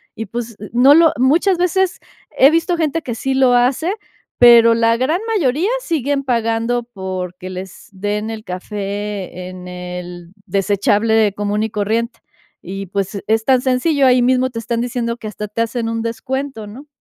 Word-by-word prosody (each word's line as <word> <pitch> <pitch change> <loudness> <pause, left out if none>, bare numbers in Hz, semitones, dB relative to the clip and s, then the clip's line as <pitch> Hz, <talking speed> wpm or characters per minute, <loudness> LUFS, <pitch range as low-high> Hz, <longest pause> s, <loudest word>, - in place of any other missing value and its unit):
Y, 225 - -5
pues, 230 +1 -6 0.2
no 255 +4 +6
lo 325 +1 +5
muchas 325 +9 +3
veces, 360 +1 +1 0.4
he 270 - +7
visto 330 +2 +1
gente 325 0 0
que 245 -6 -5
sí 265 +3 -2
lo 260 -2 +4
hace, 255 +9 +2 0.5
pero 235 -1 +8
la 230 0 +2
gran 305 - 0 0.2
mayoría 305 - +1
siguen 285 - -1
pagando 230 0 0
porque 185 -3 -6
les 185 0 -9
den 205 +3 -3
el 220 -1 -6
café 200 -1 -5
en 180 0 -9
el 180 -1 -8 0.2
desechable 205 +2 +2
común 205 +1 -1
y 220 - -2
corriente. 220 +3 -2 0.4
Y 195 +2 -6
pues, 195 +1 -3
es 220 +1 +1
tan 260 -2 +4
sencillo, 270 +3 +1
ahí 250 -1 +5
mismo 255 +1 +2
te 235 -2 -6
están 230 +1 -2
diciendo 235 -1 -2
que 220 - -8
hasta 210 0 -6
te 210 +2 -3
hacen 230 0 -2
un 225 0 -2
descuento, 235 0 -4
¿no? 250 +8 -11
230 Hz, 165 wpm, -18 LUFS, 205-260 Hz, 0.5 s, pero